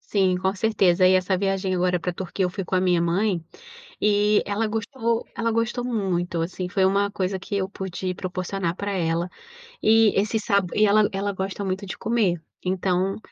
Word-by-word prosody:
Sim, 190 -3 +1
com 190 +1 0
certeza. 190 -3 +3
E 185 - +5
essa 185 +1 +2
viagem 195 0 0
agora 180 0 +1
pra 180 +1 -3
Turquia, 190 +2 -3
eu 180 - 0
fui 195 +1 -4
com 185 - -3
a - - +3
minha 180 -2 +2
mãe, 175 0 0 0.6
e 210 0 +3
ela 210 +2 -1
gostou, 230 +1 -2
ela 230 -1 0
gostou 230 +2 -1
muito, 185 -8 -1
assim, 180 +2 -4
foi 190 +1 +2
uma 200 +1 +2
coisa 190 -1 -2
que 200 - -5
eu 190 -1 -1
pude 190 -1 -4
proporcionar 180 -1 -3
pra 200 +1 -3
ela. 170 -2 -1 0.5
E 225 -1 +5
esse 215 +2 0
sabo 200 -4 0
e 215 - +5
ela 210 0 +4
ela 195 +1 -2
gosta 190 +1 -4
muito 190 0 -3
de 190 - -6
comer. 210 -7 0 0.2
Então, 185 +1 0
190 Hz, 190 wpm, -24 LUFS, 180-205 Hz, 0.6 s, E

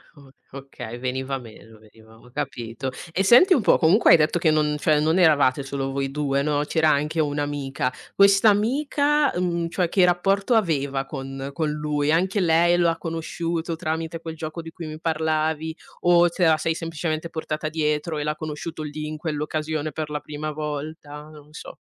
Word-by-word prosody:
o 140 -2 -17 0.3
okay, 135 -4 -8
veniva 130 +2 -3
meno, 115 -2 -14
veniva 110 +1 -19
ho 125 +2 -19
capito. 130 -2 -4 0.2
E 190 +3 0
senti 255 - +7
un 265 - +3
po', - - +4
comunque 180 +7 +4
hai - - +9
detto 155 +3 +1
che 160 - +3
non 150 -1 +2
cioè 155 -2 +3
non 160 +4 +2
eravate 145 -5 +4
solo 135 0 -4
voi 135 0 -2
2, 140 -1 -1
no, 145 0 0
c'era 160 +1 +2
anche 150 +2 0
un'amica. 145 -3 -2 0.2
Quest'amica, 255 +9 +3
uhm, 170 -2 -1
cioè 180 0 0
che 185 +2 +2
rapporto 195 +6 +2
aveva 140 -9 0
con 135 0 -6
con 155 0 -1
lui? 150 -1 -1
Anche 185 +5 +1
lei 170 -1 +4
lo 175 -1 +3
ha 165 - -1
conosciuto 165 0 -3
tramite 160 0 -3
quel 160 0 -7
gioco 160 +1 -6
di 165 - -9
cui 165 -1 -8
mi 155 0 -7
parlavi, 160 0 -1 0.2
o 175 0 +5
te 175 +1 0
la 160 -1 +5
sei 160 +2 -1
semplicemente 165 0 -4
portata 155 -1 -4
dietro 155 0 -1
e 150 - -2
l'ha 150 0 -1
conosciuto 155 +1 -6
lì, 150 0 -5
in 155 0 -5
quell'occasione 155 0 -3
per 155 +1 -5
la 150 0 -4
prima 150 +1 -5
volta? 150 0 -6
Non 150 0 -16
so. - - -10
155 Hz, 180 wpm, -23 LUFS, 145-170 Hz, 0.3 s, hai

